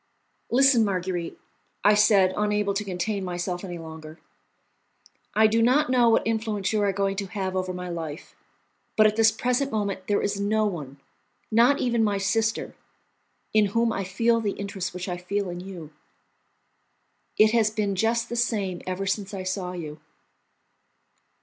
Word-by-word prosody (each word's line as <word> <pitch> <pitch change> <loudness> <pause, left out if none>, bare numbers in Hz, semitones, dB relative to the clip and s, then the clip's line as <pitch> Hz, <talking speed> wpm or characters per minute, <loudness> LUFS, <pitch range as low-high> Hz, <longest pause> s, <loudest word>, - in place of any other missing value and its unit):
"Listen, 260 -1 +5
Marguerite," 185 -4 -2 0.5
I 210 - +6
said, 200 -3 +4
unable 210 -1 0
to 205 +1 -2
contain 195 +1 -3
myself 175 0 -3
any 175 -2 -6
longer; 160 -1 -10 1.2
"I 220 - +5
do 225 +1 +3
not 255 +4 +3
know 245 -2 +4
what 225 - +3
influence 220 -3 -1
you 215 - +1
are 200 -1 +2
going 195 0 -1
to 200 -1 -3
have 190 0 -4
over 185 0 -1
my 180 0 -6
life, 165 -3 -6 0.6
but 215 - +6
at 215 0 +3
this 225 0 +5
present 250 +5 -1
moment 200 -3 -2
there 205 - +2
is 200 0 -1
no 215 +2 +1
one, 145 -9 -5 0.5
not 235 +6 +5
even 235 -2 +1
my 205 -2 +1
sister, 220 +3 0 0.8
in 215 -1 +4
whom 230 -1 +2
I 195 - -2
feel 230 +5 +1
the 205 -2 -1
interest 200 -2 -5
which 180 +1 -5
I 180 -1 -3
feel 190 +1 -3
in 175 - -6
you. 180 -4 -9 1.5
It 215 0 +6
has 225 -2 +3
been 210 -2 -1
just 230 +4 +1
the 240 - -5
same 205 -7 -1
ever 185 +1 -3
since 200 0 -2
I 190 - -5
saw 185 -1 -3
you. 155 -3 -7
200 Hz, 165 wpm, -25 LUFS, 185-220 Hz, 1.5 s, I